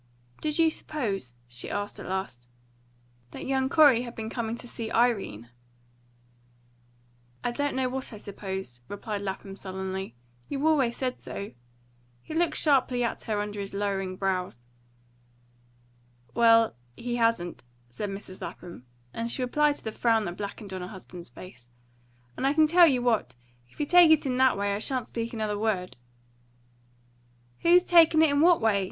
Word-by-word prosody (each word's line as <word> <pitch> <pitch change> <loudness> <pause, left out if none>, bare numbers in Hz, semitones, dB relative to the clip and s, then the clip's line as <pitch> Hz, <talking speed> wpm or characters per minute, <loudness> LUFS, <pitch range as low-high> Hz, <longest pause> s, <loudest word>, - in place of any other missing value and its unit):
"Did 305 -1 -1
you 325 -1 +4
suppose," 200 - -4
she 120 0 -5
asked 205 0 -4
at - - -8
last, 185 -11 -4 0.8
"that - - -9
that - - -6
young 265 0 0
Corey 285 -6 +6
had 240 -1 -7
been 220 0 -5
coming 230 -2 -2
to 245 - -10
see 230 -2 -5
Irene?" 200 - 0 1.9
"I 245 - 0
don't 285 +3 -1
know 260 -1 +1
what 260 +1 -4
I 215 - -8
supposed," 190 -11 -6
replied 205 0 -5
Lapham 195 0 -5
sullenly. 190 -5 -5 0.3
"You 280 +1 -2
always 270 -7 +2
said 255 -1 -3
so." 200 - -6 0.7
He - - -8
looked 330 -1 +1
sharply 260 -4 +2
at 235 - -2
her 215 -2 -1
under 205 0 -5
his 200 0 -2
lowering 195 -2 -2
brows. 185 -11 -2 1.7
"Well, 230 -1 +5 0.2
he 240 0 -3
hasn't," 230 - 0 0.3
said 205 - -4
Mrs. 195 -1 -8
Lapham; 170 -8 -9 0.3
and 230 +1 -3
she 255 - -2
replied 295 +4 +2
to - - -13
the 220 - -3
frown 225 -1 +2
that 175 - -4
blackened 200 0 -6
on 185 - -4
her 180 - -5
husband's 180 - -10
face. 125 -2 -13 0.7
"And 265 - 0
I 280 - +1
can 315 0 +6
tell 340 +2 +7
you 255 -5 +2
what, 220 - +1 0.3
if - - -23
you 295 - +1
take 350 +1 +7
it 315 -2 +5
in 255 -2 0
that 260 -4 +4
way 200 0 0
I 200 - -2
shan't 255 +1 -2
speak 230 0 -4
another 215 -3 -2
word." 200 -5 -1 1.6
"Who's 350 +1 +5
takin' 330 -3 +6
it 290 -3 +3
what 340 +3 +5
way?" 220 -3 +2
225 Hz, 165 wpm, -27 LUFS, 195-265 Hz, 1.9 s, tell